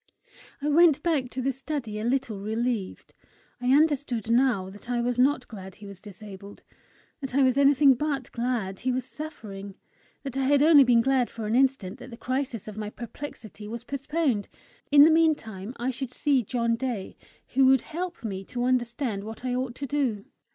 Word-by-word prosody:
I - - 0
went 305 -1 +5
back 295 -7 0
to 255 0 -4
the 270 - +1
study 265 -5 -5
a - - -4
little 240 -4 -1
relieved. 220 0 -3 0.5
I 245 - -2
understood 275 -6 +2
now 235 -6 +2
that 205 +4 -13
I 245 -1 0
was 245 +1 -1
not 260 -1 +2
glad 190 -4 -10
he 205 - -13
was 200 -2 -11
disabled; 200 -1 -11 0.6
that 270 -3 -5
I 280 - +5
was 255 -1 +3
anything 280 0 +5
but 280 0 -3
glad 235 -6 -2
he 255 - -1
was 255 -1 -2
suffering; 205 -11 -8 0.5
that 270 -3 -6
I 270 -1 0
had 285 +1 +4
only 305 -3 +8
been 240 -2 +4
glad 260 0 +2
for 225 -2 -6
an 215 - -1
instant 255 -7 +1
that 255 - -10
the 230 - -10
crisis 255 -5 -3
of 215 -1 -8
my 210 -1 -4
perplexity 225 -3 -9
was 235 +2 -6
postponed. 275 -4 -1 0.4
In 285 0 +9
the 320 - +7
meantime 255 -10 +1
I 250 +2 -1
should 255 0 -5
see 275 0 +2
John 235 +1 0
Day, 235 -6 -4 0.3
who 265 0 +4
would 265 -2 +5
help 345 0 -5
me 195 -4 -4
to 245 +4 -4
understand 240 -4 -1
what 220 +3 -8
I 250 - -1
ought 250 -1 -2
to 280 - -5
do! 260 -8 -1
250 Hz, 190 wpm, -26 LUFS, 220-275 Hz, 0.6 s, In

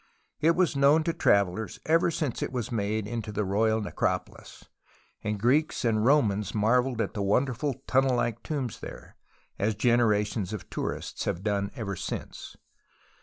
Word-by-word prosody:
It 165 +2 +3
was 180 -5 +2
known 140 +3 +5
to 165 +1 0
travellers 100 - +1
ever 165 +2 +3
since 150 -6 -2
it - - -2
was 125 -4 -3
made 110 -1 -1
into 110 0 -4
the 105 0 -1
royal 110 +3 +2
necropolis, 105 - -3 0.6
and 105 -1 -2
Greeks 135 +6 +2
and 110 -2 +2
Romans 110 -8 +2
marvelled 125 +3 +2
at - - -2
the 105 - -3
wonderful 125 +6 +1
tunnel 130 0 +3
like 115 -1 -1
tombs 135 -6 -4
there, - - -10 0.4
as 105 +2 +1
generations 110 -3 +1
of 105 - -7
tourists - - -4
have 85 - -2
done 100 -2 0
ever 105 -6 -4
since. - - -6
115 Hz, 155 wpm, -28 LUFS, 105-135 Hz, 0.6 s, known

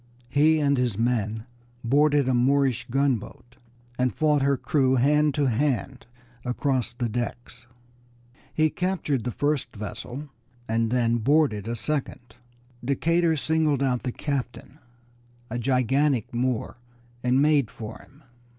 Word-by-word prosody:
He 155 +2 +4
and 140 -2 +2
his 120 -5 0
men 110 -2 -1 0.4
boarded 145 +2 +3
a 130 - +2
Moorish 130 -1 +2
gunboat 125 -2 -2 0.4
and 125 0 +2
fought 150 -2 +2
her 140 0 +2
crew 130 -1 +1
hand 150 +3 +3
to 145 -2 +1
hand 130 +1 -1 0.4
across 125 -1 -1
the 120 0 -3
decks. 120 +1 -5 0.8
He 155 -1 +2
captured 160 - -1
the 125 - -1
first 145 0 -1
vessel, 120 +7 -6 0.4
and 115 0 0
then 120 -1 +1
boarded 120 -4 +2
a 120 - -2
second. 125 -2 -4 0.5
Decatur 165 +5 +1
singled 155 -2 +1
out 125 -2 0
the 125 - -3
captain, 135 +1 -5 0.7
a 120 - -2
gigantic 130 0 +1
Moor, 120 -1 -2 0.5
and 125 +1 +3
made 145 -5 +3
for 110 +1 -8
him. 145 +3 -20
130 Hz, 130 wpm, -25 LUFS, 120-145 Hz, 0.8 s, He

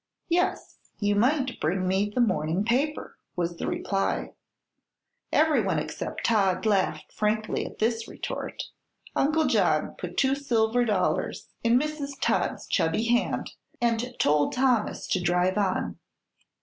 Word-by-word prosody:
"Yes; 355 +1 0 0.2
you 205 -1 +2
might 260 +4 +1
bring 185 +4 0
me 195 +2 +1
the 245 +4 0
morning 185 -4 +1
paper," 275 +6 -1 0.2
was 170 -1 -2
the - - -3
reply. 195 -1 -1 1.0
Everyone 310 -1 +3
except - - -4
Todd 200 -3 +2
laughed 200 -3 +1
frankly 215 +1 -1
at - - -11
this 225 0 0
retort. - - -5 0.5
Uncle 310 +3 +2
John 195 - +2
put 180 -1 -6
two 265 0 +3
silver 245 -3 +1
dollars 205 -5 -1
in 230 +1 +4
Mrs. 285 -2 -4
Todd's - - 0
chubby 160 +7 +1
hand 240 +1 +1 0.3
and 240 +1 0
told 145 0 +2
Thomas 250 -4 +1
to 185 - 0
drive 180 +3 +2
on. 190 -2 -1
220 Hz, 130 wpm, -27 LUFS, 185-255 Hz, 1.0 s, in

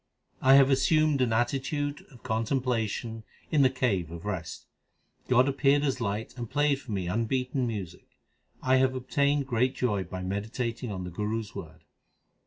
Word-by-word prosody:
I 135 +1 +7
have 135 0 +6
assumed 150 +1 +3
an 125 -3 +2
attitude 135 +5 -1
of 125 -5 -17
contemplation 115 -1 -1 0.3
in 150 - +4
the 130 - +6
cave 115 -10 0
of 85 +2 -9
rest. 90 -7 -5 0.6
God 125 +1 +4
appeared 140 +1 +3
as 135 -4 -1
light 110 +1 -3
and 120 -3 -5
played 145 -2 +1
for 120 - -9
me 95 -4 -2
unbeaten 125 +5 -1
music; 100 -7 -6 0.6
I 130 0 +4
have 130 0 +2
obtained 140 +2 +1
great 125 0 +1
joy 105 -6 0
by 90 +1 -6
meditating 110 +5 -3
on 95 -2 -4
the 90 - -6
Guru 105 +5 -2
s 105 - -11
word. - - -9
125 Hz, 165 wpm, -28 LUFS, 105-135 Hz, 0.6 s, I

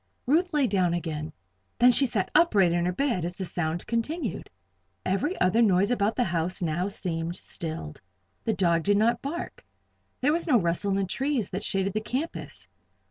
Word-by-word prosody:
Ruth 335 +8 +2
lay 295 -4 +2
down 185 -6 +1
again; 155 -2 -4 0.5
then 245 +1 +6
she 270 +2 +4
sat 195 -5 -1
upright 210 - +4
in 170 0 +1
her - - +1
bed 235 - 0
as 175 +1 -3
the 190 - -4
sound 170 -1 -3
continued. 235 - -3 0.6
Every 200 - -1
other 185 +6 +3
noise 200 0 +3
about 215 -2 +1
the 250 - +2
house 175 -2 -1
now 175 +1 -1
seemed 170 -4 -3
stilled. 155 - -6 0.4
The 225 - 0
dog 170 -4 +2
did 200 +4 +2
not 230 +3 +2
bark. 315 +5 -5 0.6
There 290 +4 +2
was 340 +2 -1
no 255 -7 +5
rustle 170 +2 0
in 195 - +1
the 195 - +1
trees 265 +2 -1
that 195 +2 -3
shaded 195 -1 0
the 215 - -1
campus. 260 +9 -5
195 Hz, 185 wpm, -27 LUFS, 175-245 Hz, 0.6 s, then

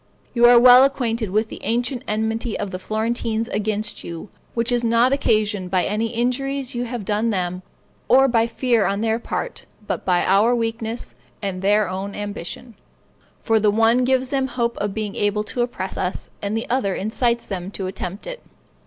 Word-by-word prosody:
You 240 0 +6
are 240 0 +8
well 250 +1 +9
acquainted 235 -6 0
with 215 +3 0
the - - -9
ancient 245 +2 -1
enmity 220 +2 -1
of 200 - -4
the 185 - -5
Florentines 225 +2 -1
against 215 0 -2
you, 170 +4 -7 0.3
which 235 +1 0
is 240 -1 +1
not 235 +3 +3
occasioned 210 -7 +1
by 185 -1 +2
any 215 +2 0
injuries 255 +3 -1
you 245 0 -2
have 240 -4 -5
done 215 +3 0
them, 180 -3 -2 0.5
or 270 +1 +6
by 230 -2 +2
fear 235 -2 +1
on 200 +1 -1
their 225 0 +1
part, - - -5 0.2
but - - -3
by 180 -2 +2
our 210 +6 +4
weakness 225 - -3 0.3
and 190 -2 -4
their 205 +1 +3
own 190 +2 -4
ambition; 205 +3 -6 0.7
for 225 -1 +2
the 210 0 +3
one 225 +3 +4
gives 260 0 +1
them 270 -1 0
hope 235 -2 -1
of 205 -1 -3
being 215 -2 -3
able 205 +1 0
to 240 +3 -3
oppress 235 -6 -3
us, 185 0 -3
and 205 +2 -2
the 225 - -4
other 225 -6 0
incites 235 +3 0
them 185 -2 -5
to 195 -1 -5
attempt 185 +1 -5
it. - - -7
225 Hz, 185 wpm, -22 LUFS, 205-240 Hz, 0.7 s, well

